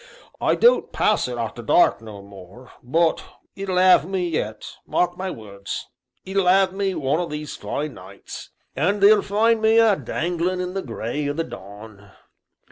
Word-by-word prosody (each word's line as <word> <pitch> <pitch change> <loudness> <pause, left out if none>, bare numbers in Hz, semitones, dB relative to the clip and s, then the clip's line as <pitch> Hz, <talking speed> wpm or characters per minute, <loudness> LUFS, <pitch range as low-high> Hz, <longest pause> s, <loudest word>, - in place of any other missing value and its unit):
I - - +2
don't 485 +1 +3
pass 215 - +1
it 125 -1 -5
arter 115 0 -4
dark 120 +2 +3
no 105 -3 -10
more, 100 +5 -14
but 160 +6 +1 0.3
it'll 195 -2 -3
'ave 180 -4 +5
me 185 -2 -1
yet 110 -9 -3 0.2
mark 175 0 0
my 190 +1 -4
words 100 - -7 0.4
it'll 190 -1 0
'ave 190 0 +4
me 195 -1 -1
one 150 0 0
o' 175 - -2
these 150 -1 -6
fine 150 -1 -4
nights; 95 +2 -11 0.3
and 200 +8 +1
they'll 205 +1 +6
find 220 +3 +2
me 220 +1 +4
a 225 -3 +5
danglin' 175 +1 -2
in 180 0 -3
the 195 - -2
gray 130 +3 -4
o' - - -1
the 165 +3 -2
dawn!" 100 -3 -12
165 Hz, 170 wpm, -22 LUFS, 115-190 Hz, 0.4 s, they'll